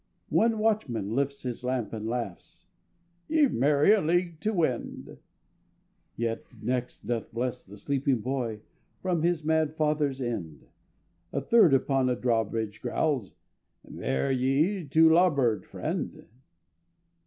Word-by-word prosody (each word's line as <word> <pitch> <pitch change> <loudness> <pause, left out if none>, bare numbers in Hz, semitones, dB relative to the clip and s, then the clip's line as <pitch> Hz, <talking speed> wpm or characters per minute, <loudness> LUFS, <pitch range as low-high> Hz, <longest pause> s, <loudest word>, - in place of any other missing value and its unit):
One 225 0 +3
watchman 175 - 0
lifts 140 +2 -1
his 125 -1 -5
lamp 125 -3 -2
and 110 0 -4
laughs: 115 -6 -5 0.6
"Ye've 305 -3 +3
many 145 - +4
a 215 -2 +5
league 170 0 0
to 215 +4 0
wend." 160 - -2 1.0
The 115 -1 -1 0.2
next 125 +3 -3
doth 120 -2 -3
bless 125 +2 -3
the 100 +2 -13
sleeping 135 +2 0
boy 120 -4 -3 0.4
From 180 -3 0
his 170 -1 +1
mad 160 -1 +1
father's 150 -3 0
end; 95 - -4 0.7
A - - -1
third 165 - +5
upon 135 -1 +1
a 125 - +1
drawbridge 115 -3 -1
growls: 135 - -1 0.6
"Bear 65 - -1
ye 140 +9 +1
to 160 +4 +5
larboard, 140 - +3
friend." - - -4
135 Hz, 125 wpm, -28 LUFS, 115-160 Hz, 1.0 s, a